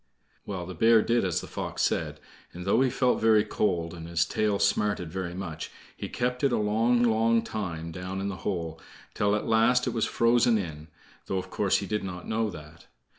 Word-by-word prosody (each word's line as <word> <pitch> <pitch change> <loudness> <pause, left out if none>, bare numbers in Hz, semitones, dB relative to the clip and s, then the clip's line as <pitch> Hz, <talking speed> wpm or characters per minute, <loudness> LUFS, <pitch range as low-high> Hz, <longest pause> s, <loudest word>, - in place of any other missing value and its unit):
Well, 95 -4 -4
the 95 - -7
bear 110 +5 +5
did 120 0 +2
as 90 -4 0
the - - -9
fox - - -3
said, - - -1 0.3
and 90 0 -8
though 100 +5 +3
he 135 - +3
felt 125 0 +1
very 110 -1 +5
cold, 90 -6 -1
and 85 -1 -8
his 85 +1 +1
tail 105 +3 0
smarted 100 -4 0
very 90 -2 -4
much, 85 -5 -5 0.3
he - - -6
kept 125 +2 -2
it 140 - +4
a - - +2
long, 115 +3 +2
long 115 0 +3
time 85 -8 -4
down 90 +3 -5
in 100 - -2
the 100 -2 -4
hole, 85 -5 -4 0.3
till 105 0 +1
at 105 - -2
last 115 +3 +3
it - - -1
was 115 - +1
frozen 115 0 +3
in, 80 -5 -5 0.4
though 95 - -1
of 95 - -5
course - - +2
he - - -3
did 105 -1 -2
not 90 -2 -6
know 110 0 0
that. 75 -2 -12
100 Hz, 210 wpm, -27 LUFS, 90-115 Hz, 0.4 s, bear